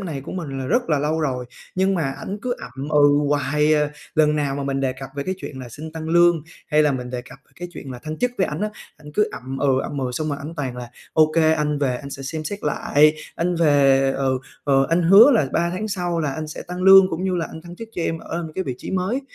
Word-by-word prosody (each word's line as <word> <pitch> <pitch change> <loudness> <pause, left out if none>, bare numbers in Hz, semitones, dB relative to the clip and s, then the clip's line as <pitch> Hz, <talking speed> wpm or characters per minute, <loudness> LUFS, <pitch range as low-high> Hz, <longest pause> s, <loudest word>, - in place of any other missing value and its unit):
này 160 -8 -4
của 135 - -8
mình 145 -7 -5
là 130 - -4
rất 240 +5 +1
là 150 - +3
lâu 155 +3 0
rồi, 130 -5 -1 0.3
nhưng 190 +1 +2
mà 155 -6 0
ảnh 200 +2 -5
cứ 250 -1 -1
ậm 135 +3 -7
ừ 145 -1 +5
hoài 150 +2 +2
à. 150 -1 +1 0.2
Lần 150 -1 +3
nào 145 -2 0
mà 140 - -3
mình 135 0 -1
đề 130 -1 0
cập 130 0 -9
về 140 - -1
cái 185 +5 -2
chuyện 140 -7 -8
là 125 - -8
xin 155 +6 -9
tăng 160 0 -6
lương, 170 -2 +4 0.2
hay 155 -1 +3
là 150 -2 +3
mình 125 -1 -4
đề 125 -1 -4
cập 125 +1 -14 0.2
cái 175 +1 -6
chuyện 135 -6 -9
là 125 - -7
thăng 155 +4 -7
chức 250 - +1
với 190 - +3
ảnh 150 +4 -5
á, 210 - 0 0.3
ảnh 150 -1 -13
cứ 210 - +2
ậm 130 +1 -6
ừ, 135 -2 +2
ậm 145 - -5
ừ, 130 -2 -2
xong 155 +4 -2
rồi 145 - -2
ảnh 155 +4 -7
toàn 130 -4 -3
là 125 -1 -7 0.2
"Ô 155 -1 +4
kê, 160 -1 +4
anh 150 -2 0
về 130 -3 0
anh 140 +2 -9
sẽ 135 - -7
xem 155 +3 -5
xét 200 +6 -4
lại, 150 0 +3 0.2
anh 175 +1 0
về, 135 -4 +4
ừ, 135 -1 0 0.3
ờ, 135 -1 +3
anh 170 +2 +2
hứa 200 +10 +8
là 220 - +3
3 170 0 +1
tháng 195 +5 -3
sau 175 -4 -2
là 145 -4 -1
anh 155 +2 -5
sẽ 155 - -7
tăng 180 +1 -6
lương, 190 0 +8
cũng 165 +3 -3
như 190 -1 0
là 165 - -1
anh 160 - -9
thăng 175 +1 -11
chức 225 +2 -8
cho 175 - -3
em 165 0 -1
ở 170 0 -5
cái 190 - -2
vị 130 - -3
trí - - -7
mới." 190 +8 -1
150 Hz, 280 wpm, -22 LUFS, 135-175 Hz, 0.3 s, hứa